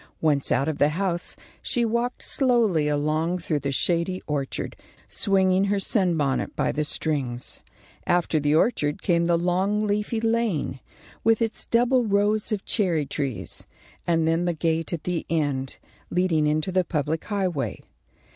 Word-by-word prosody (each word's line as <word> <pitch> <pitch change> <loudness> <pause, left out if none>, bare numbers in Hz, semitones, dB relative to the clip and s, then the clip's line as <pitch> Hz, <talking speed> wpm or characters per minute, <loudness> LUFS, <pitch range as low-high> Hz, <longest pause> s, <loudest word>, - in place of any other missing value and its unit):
Once 145 -3 +2
out 135 +4 +2
of 155 -2 -2
the 145 - +4
house, 175 +1 -2 0.3
she 240 -1 0
walked 235 +2 -1
slowly 230 - +2
along 155 +4 0
through 165 -3 -1
the 140 0 -2
shady 170 +6 0
orchard, 145 -3 -3 0.3
swinging 190 -1 +2
her 200 0 +1
sunbonnet 170 - 0
by - - +1
the 150 - -1
strings. 135 -5 -3 0.5
After 175 -2 +2
the 145 +1 +2
orchard 150 -5 +1
came 170 -2 +2
the 170 0 +3
long 190 +5 +1
leafy 210 +2 -1
lane, 225 - 0 0.4
with 225 -1 +4
its 225 -1 -1
double 245 +2 +3
rows 210 0 +1
of 205 -2 -2
cherry 175 -9 +1
trees, 130 - -4 0.4
and 165 -2 +2
then 165 +2 +1
the 175 - +1
gate 165 0 -1
at 170 -3 -3
the 180 -2 -2
end, 145 -5 -1 0.3
leading 170 -4 +2
into 155 +4 0
the 185 0 +2
public 155 -1 -2
highway. 185 -9 -2
170 Hz, 150 wpm, -25 LUFS, 150-200 Hz, 0.5 s, the